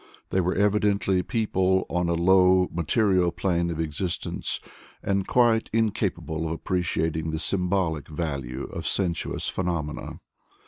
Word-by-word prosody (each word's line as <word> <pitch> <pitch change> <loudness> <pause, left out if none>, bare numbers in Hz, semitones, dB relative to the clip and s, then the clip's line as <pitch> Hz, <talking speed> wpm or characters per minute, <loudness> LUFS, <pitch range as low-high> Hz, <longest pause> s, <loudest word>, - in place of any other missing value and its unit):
They 95 - +2
were 90 +1 0
evidently 100 -2 +2
people 95 -3 +1
on 90 -1 -1
a 85 - +2
low, 90 +1 +5
material 90 +1 +2
plane 85 0 0
of 80 -2 -4
existence, 80 +3 -3 0.4
and 100 -1 0
quite 115 -2 +3
incapable 105 -7 -1
of 80 - -2
appreciating 80 -2 -1
the 80 - -2
symbolic 90 -3 -1
value 70 -5 -4
of - - -5
sensuous 85 -4 0
phenomena. 85 -5 -3
90 Hz, 125 wpm, -26 LUFS, 80-95 Hz, 0.4 s, low